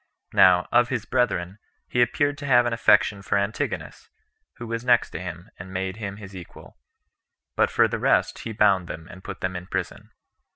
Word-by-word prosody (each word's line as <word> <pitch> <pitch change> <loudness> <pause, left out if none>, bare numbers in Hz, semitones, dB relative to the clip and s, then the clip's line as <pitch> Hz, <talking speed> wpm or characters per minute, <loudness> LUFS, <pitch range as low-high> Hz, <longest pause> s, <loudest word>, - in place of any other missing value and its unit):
Now, 90 -1 +5
of 120 0 +4
his 120 -5 -3
brethren, 105 -6 -1 0.3
he 125 - +1
appeared 145 +4 +1
to 140 - -6
have 120 -2 +5
an 120 - -1
affection 105 -3 +3
for 100 - 0
Antigonus, 100 +2 -3 0.5
who 120 - -8
was 115 0 -4
next 120 -1 +3
to - - -6
him, 90 +3 -8
and 95 +2 -9
made 95 +1 -3
him 100 -3 -6
his 100 -2 -11
equal; 90 -3 -12 0.8
but - - +3
for - - +3
the - - -4
rest, - - +1
he 115 - -6
bound 100 -4 +2
them, 80 0 -8
and 95 +1 -13
put - - -8
them 95 0 -2
in 90 0 -6
prison. 95 -3 -5
100 Hz, 195 wpm, -24 LUFS, 95-120 Hz, 0.8 s, Now